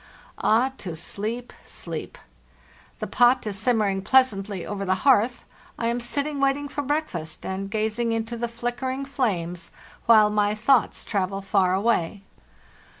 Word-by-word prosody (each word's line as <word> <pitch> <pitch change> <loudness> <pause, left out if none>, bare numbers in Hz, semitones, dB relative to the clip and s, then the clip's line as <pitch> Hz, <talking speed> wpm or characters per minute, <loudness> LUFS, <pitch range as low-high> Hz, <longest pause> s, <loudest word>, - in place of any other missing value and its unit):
Ah, 245 +5 +3
to 175 -4 -5
sleep, 220 +8 -4
sleep! 165 -3 -6 0.8
The - - -4
pot 245 0 +3
is 210 -2 -2
simmering 205 -3 +1
pleasantly 200 -5 +2
over 200 -1 -4
the 185 -1 +1
hearth; 245 -2 +3 0.3
I 230 - 0
am 240 +1 -1
sitting 280 +4 -1
waiting 275 +1 +1
for 290 +1 -3
breakfast, 275 - -3
and 190 +1 -4
gazing 220 +2 -1
into 225 +1 -2
the 235 +1 -2
flickering 245 +3 -3
flames, 180 - -2 0.4
while 215 -2 +7
my 210 0 +2
thoughts 230 +2 +2
travel 195 -1 -2
far 190 -2 +2
away. 200 -2 0
220 Hz, 140 wpm, -25 LUFS, 195-245 Hz, 0.8 s, while